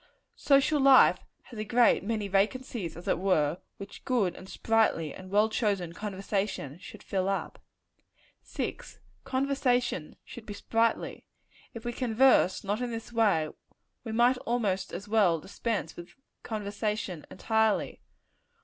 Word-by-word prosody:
Social 280 +2 +3
life 270 -1 +6 0.2
has 230 - -11
a - - -1
great 235 0 +3
many 215 -1 -2
vacancies, 200 -2 -1
as 175 - -11
it - - +1
were, 170 -4 +1 0.2
which 200 0 -10
good, 215 -9 +1
and 190 - -12
sprightly, 220 -9 +1
and 185 0 -11
well 210 +2 +3
chosen 200 -6 -1
conversation 195 -6 -3
should - - -12
fill 190 -1 -1
up. 195 - -3 0.8
6. - - -6 0.3
Conversation 260 - 0
should 235 - -11
be 205 - -6
sprightly. 225 +2 -1 0.5
If 230 - -8
we 240 - -2
converse 250 -5 +3
not 205 +4 -2
in 245 - -2
this 230 0 -7
way, 200 -9 +2 0.5
we 225 - -5
might 240 +3 +3
almost 220 -7 -1
as 195 +4 -7
well 205 -6 +3
dispense 215 +5 -4
with 175 0 -11 0.3
conversation 210 -5 -3
entirely. 220 -1 0
215 Hz, 135 wpm, -29 LUFS, 190-235 Hz, 0.8 s, life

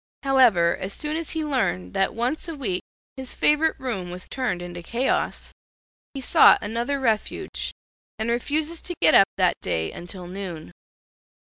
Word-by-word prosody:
However, 240 -11 +4
as 195 +2 -5
soon 300 0 -2
as 325 -1 -3
he 315 - -1
learned 90 - -1
that 195 - 0
once 250 +9 -1
a 330 - -5
week 220 -11 -2 0.4
his 260 -1 -4
favorite 305 +2 +2
room 205 -9 -3
was 180 +1 -7
turned 255 -9 -2
into 175 0 -7
chaos, 240 +9 -1 0.6
he 270 - -4
sought - - +7
another 235 +6 -2
refuge, 225 -5 -2 0.5
and 220 - -2
refuses 300 +7 -1
to 350 - -4
get - - +5
up 195 - +7
that 185 -2 +2
day 80 0 -1
until 180 +1 -7
noon. 175 - -7
235 Hz, 155 wpm, -24 LUFS, 180-275 Hz, 0.6 s, sought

